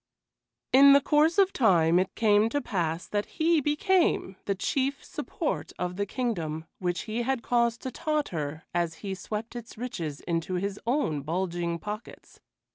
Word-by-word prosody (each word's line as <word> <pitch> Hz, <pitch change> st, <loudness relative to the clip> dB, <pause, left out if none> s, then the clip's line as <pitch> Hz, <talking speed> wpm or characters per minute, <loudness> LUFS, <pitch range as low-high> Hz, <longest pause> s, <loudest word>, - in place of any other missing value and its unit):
In 275 Hz, +1 st, +9 dB
the 280 Hz, -, +8 dB
course 305 Hz, +5 st, +3 dB
of 390 Hz, -1 st, +4 dB
time 175 Hz, -7 st, +4 dB
it 185 Hz, -, -2 dB
came 215 Hz, 0 st, +4 dB
to 290 Hz, -, 0 dB
pass 170 Hz, -, -2 dB
that 205 Hz, 0 st, -2 dB
he 320 Hz, -1 st, +3 dB
became 295 Hz, -, +1 dB
the 200 Hz, -, 0 dB
chief 270 Hz, +7 st, -1 dB
support -, -, -4 dB
of 180 Hz, 0 st, -3 dB
the 200 Hz, +1 st, -2 dB
kingdom 165 Hz, -11 st, -2 dB
which 180 Hz, -1 st, -1 dB
he 225 Hz, +2 st, -3 dB
had 250 Hz, -1 st, -1 dB
caused 235 Hz, -1 st, +1 dB
to 260 Hz, -, -3 dB
totter 175 Hz, -, -2 dB
as 170 Hz, -2 st, 0 dB
he 195 Hz, -, -2 dB
swept 210 Hz, +5 st, -5 dB
its 235 Hz, -2 st, -8 dB
riches 170 Hz, -, -4 dB
into 170 Hz, +1 st, -2 dB
his 200 Hz, +2 st, -2 dB
own 235 Hz, -, +1 dB
bulging 170 Hz, +2 st, -2 dB
pockets. 210 Hz, +5 st, -8 dB
210 Hz, 160 wpm, -28 LUFS, 175-265 Hz, -, In